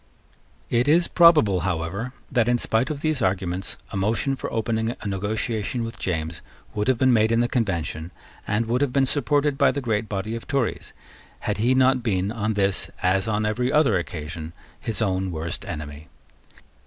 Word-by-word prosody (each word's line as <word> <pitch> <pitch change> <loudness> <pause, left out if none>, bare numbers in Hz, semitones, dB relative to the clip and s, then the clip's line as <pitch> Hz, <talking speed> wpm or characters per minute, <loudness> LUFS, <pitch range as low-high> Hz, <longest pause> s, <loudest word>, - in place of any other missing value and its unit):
It 120 +2 +2
is 170 +4 +4
probable, 155 - +5
however, 90 +6 -2 0.2
that, 120 -3 +2
in 120 0 +3
spite 115 +1 0
of 145 -2 -4
these 155 -4 0
arguments, 95 -1 -1
a - - -3
motion 110 +7 +1
for - - -5
opening 115 +1 -1
a - - -6
negotiation 110 +4 -2
with 115 0 -6
James 80 -2 -3 0.3
would 105 +2 -1
have 130 -2 +3
been 130 +1 +4
made 110 -1 +3
in 115 - +3
the 120 - +2
Convention, 85 -9 -2 0.4
and 110 +3 +1
would 120 +3 0
have 145 -3 +1
been 135 -1 +3
supported 145 +1 +1
by - - +5
the 145 - -1
great 110 -4 -1
body 105 +3 -3
of 115 - -7
Tories, 135 -5 -1 0.5
had - - -2
he 120 +4 +3
not 130 0 +4
been, 100 -4 0
on 110 -1 -1
this, 100 -1 0
as 95 +2 +2
on 105 -1 0
every 125 +4 0
other 150 -8 +4
occasion, 80 -1 -4 0.3
his 115 0 -2
own 95 -2 0
worst 85 0 -4
enemy. 75 -1 -7
110 Hz, 180 wpm, -24 LUFS, 95-125 Hz, 0.5 s, probable